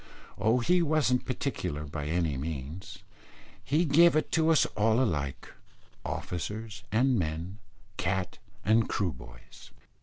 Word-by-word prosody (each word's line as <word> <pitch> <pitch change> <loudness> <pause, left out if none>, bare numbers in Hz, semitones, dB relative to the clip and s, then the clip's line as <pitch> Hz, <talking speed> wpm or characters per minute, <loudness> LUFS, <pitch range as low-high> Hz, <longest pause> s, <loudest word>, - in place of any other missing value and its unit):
Oh, 110 +4 +3
he 180 +8 +3
wasn't 150 -6 +2
particular 75 +1 -3
by 75 0 -5
any 80 -2 0
means; 75 +4 -6 0.6
he 155 +5 +2
gave 165 +2 +6
it 155 - 0
to 160 -1 +3
us 160 - +5
all 110 +2 +3
alike 75 - -2 0.5
officers 105 +4 -5
and 125 +2 +3
men, 85 +4 -3 0.4
cat 95 0 -2 0.3
and 110 +2 +3
Kroo 95 -4 0
boys.) - - -14
100 Hz, 125 wpm, -29 LUFS, 80-130 Hz, 0.6 s, gave